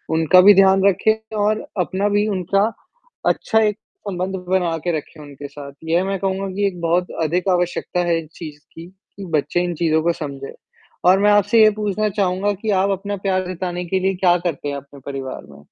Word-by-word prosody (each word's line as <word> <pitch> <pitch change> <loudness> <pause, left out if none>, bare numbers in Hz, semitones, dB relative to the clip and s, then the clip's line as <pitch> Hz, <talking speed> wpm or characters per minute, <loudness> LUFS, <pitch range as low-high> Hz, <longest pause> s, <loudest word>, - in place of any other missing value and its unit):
उनका 165 +3 +5
भी 205 +2 +8
ध्यान 190 0 +5
रखें 220 +3 0
और 210 +1 0 0.2
अपना 190 +3 -1
भी 205 +1 +1
उनका 195 0 +1 0.6
अच्छा 220 - +1
एक 210 -1 0 0.3
संबंध 185 0 -3
बना 180 -3 +1
के 175 -2 +1
रखें 155 +1 -10
उनके 145 0 -9
साथ। 140 0 -10 0.2
यह 170 +3 +2
मैं 195 0 -2
कहूँगा 195 0 -2
कि 200 0 +1
एक 180 -3 -5
बहुत 175 +2 +1 0.2
अधिक 175 +4 0
आवश्यकता 180 0 -1
है 170 -1 +2
इस 155 - -17
चीज़ 150 -3 -9
की, 165 - -10
कि 190 +1 -13
बच्चे 160 +4 -1
इन 175 -1 -3
चीज़ों 160 -1 +1
को 170 +1 +2
समझें। 140 -4 -7 0.6
और 190 +1 +5
मैं 205 +1 +4
आपसे 205 +2 +4
ये 215 - +7
पूछना 210 0 -1
चाहूँगा 195 0 0
कि 220 - -3
आप 195 - +1
अपना 200 +1 -3
प्यार 185 -1 0
जताने 180 0 -4
के 190 +2 -1
लिए 190 +1 0
क्या 180 -1 +3
करते 165 -5 -3
हैं 140 - -3
अपने 140 0 -12
परिवार 135 - -6
में? 70 - -14
185 Hz, 200 wpm, -20 LUFS, 165-200 Hz, 0.6 s, भी